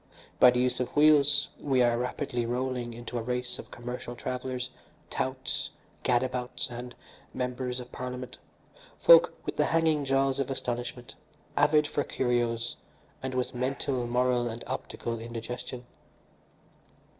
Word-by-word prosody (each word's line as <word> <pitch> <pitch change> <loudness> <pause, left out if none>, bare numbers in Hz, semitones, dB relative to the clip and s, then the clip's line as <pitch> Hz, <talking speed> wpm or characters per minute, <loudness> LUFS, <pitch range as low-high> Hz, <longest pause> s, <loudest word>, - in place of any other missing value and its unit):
By 125 - +9
the 125 0 +2
use 125 0 +1
of 125 - -3
wheels 145 -1 +5
we 130 -3 +3
are 120 -1 +4
rapidly 125 0 -2
rolling 125 0 -1
into 120 +1 -5
a - - -3
race 125 +1 -2
of - - -9
commercial 120 0 -6
travellers, 125 +1 -3 0.4
touts, - - -2 0.3
gad 120 0 +3
abouts, 125 -1 -3
and 120 +1 -7 0.4
members 125 0 -2
of 125 0 -9
parliament, 125 0 -6 0.6
folk - - +7
with - - -4
the - - +4
hanging 160 -2 +2
jaws 135 0 +2
of 135 - 0
astonishment, 120 -1 -3 0.4
avid 150 -1 +5
for 145 -1 -1
curios, 120 -3 0 0.4
and 130 0 -3
with 125 -1 -1
mental, 130 0 -1
moral 125 0 +2
and 115 +1 -6
optical 115 -1 -4
indigestion. 120 +2 -6
125 Hz, 135 wpm, -29 LUFS, 120-130 Hz, 0.6 s, By